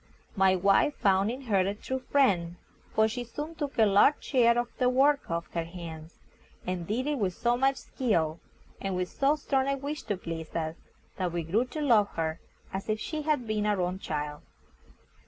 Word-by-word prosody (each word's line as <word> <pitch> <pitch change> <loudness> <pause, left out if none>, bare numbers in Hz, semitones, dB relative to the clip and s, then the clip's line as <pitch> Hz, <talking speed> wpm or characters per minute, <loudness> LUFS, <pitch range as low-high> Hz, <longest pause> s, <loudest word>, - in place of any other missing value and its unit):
My 190 -1 +4
wife 195 +10 +3
found 195 +1 +2
in 255 +3 -5
her 210 -6 +2
a 195 +2 +1
true 260 +5 -4
friend, 190 -12 +2 0.4
for 220 0 +3
she 245 +3 -4
soon 295 +7 -6
took 295 -4 -5
a 225 - +6
large 205 +8 +4
share 235 -3 +3
of 240 0 -2
the 250 -1 +4
work 275 +3 +3
off 170 0 -3
her 170 - -1
hands, 165 -2 -9 0.5
and 180 -2 -3
did 240 +5 -1
it 295 -2 -1
with 185 -4 0
so 240 +1 +1
much 270 +2 +2
skill, 170 -11 -1 0.4
and 195 -1 -2
with 180 0 -1
so 280 +2 +2
strong 270 -3 0
a 275 0 0
wish 290 +3 -4
to 205 - -1
please 165 -2 -6
us, 160 -1 -2 0.4
that 185 -2 -1
we 170 0 -2
grew 205 +10 +1
to 305 +4 -6
love 225 -7 +5
her 160 0 -2 0.3
as 195 +3 -4
if 215 0 0
she 310 +6 -3
had 295 -5 0
been 215 -1 -1
our 205 -2 +1
own 180 +1 -1
child. 150 -3 -4
210 Hz, 200 wpm, -29 LUFS, 175-260 Hz, 0.5 s, a